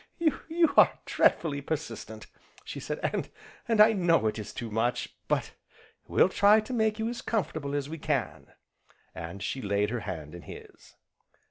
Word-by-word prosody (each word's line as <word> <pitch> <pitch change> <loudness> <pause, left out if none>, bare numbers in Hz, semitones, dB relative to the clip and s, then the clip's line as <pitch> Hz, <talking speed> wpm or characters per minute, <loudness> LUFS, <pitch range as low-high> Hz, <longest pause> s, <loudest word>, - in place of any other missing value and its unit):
"You 330 0 +1
are - - +6
dreadfully 145 -4 +2
persistent!" 120 -8 -5 0.4
she - - -6
said, - - -4 0.7
"and 225 -2 +1
I 215 +1 +8
know 175 - +3
it 110 0 0
is 105 - -6
too 115 -2 -6
much, 115 +3 -1
but - - 0 0.6
we'll - - +4
try 200 +3 +5
to 215 +4 -5
make 220 -2 +1
you 220 0 -1
as 240 0 -4
comfortable 155 -10 -2
as 140 -1 -2
we 160 +2 -7
can," 145 -6 -2 0.7
and 85 +4 -7
she 130 +7 -3
laid 100 0 0
her 120 - -1
hand 80 -7 -6
in 85 - -9
his. - - -13
145 Hz, 160 wpm, -28 LUFS, -, 0.7 s, I